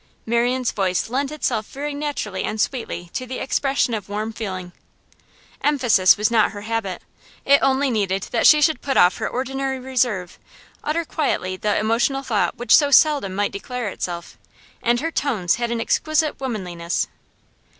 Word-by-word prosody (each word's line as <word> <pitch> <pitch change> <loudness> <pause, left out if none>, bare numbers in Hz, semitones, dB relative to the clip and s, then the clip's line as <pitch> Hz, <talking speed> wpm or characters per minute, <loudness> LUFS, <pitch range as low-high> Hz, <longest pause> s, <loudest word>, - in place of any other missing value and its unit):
Marian's 240 +2 +1
voice 185 -1 -1
lent 275 +2 -1
itself 240 -8 -2
very 290 +2 -5
naturally 285 -10 -3
and 215 - -3
sweetly 210 -8 -3
to 255 - -4
the 255 - -5
expression 270 -2 0
of 205 -3 -4
warm 215 +2 -3
feeling. 185 -5 -5 0.9
Emphasis 245 -10 +4
was 210 +3 +1
not 225 -2 +3
her 205 - -7
habit; 215 -4 -3 0.4
it 280 0 +5
only 270 0 +2
needed 195 -3 0
that - - +4
she 300 -1 +7
should 315 0 +2
put 270 -2 -1
off 180 +1 +5
her - - -2
ordinary 270 +1 -3
reserve, 245 -8 -1 0.4
utter 325 +3 -1
quietly 185 - -1
the 210 +2 0
emotional 235 +5 +1
thought 220 -6 0
which 240 - +5
so 290 -2 +4
seldom 285 -10 +4
might 205 +1 0
declare 245 +2 -4
itself, 175 -2 -6 0.4
and 240 +1 +1
her 330 +2 -2
tones 220 - 0
had 235 -1 -2
an 235 -1 -2
exquisite 310 +6 0
womanliness. 180 -10 -3
235 Hz, 160 wpm, -22 LUFS, 205-270 Hz, 0.9 s, she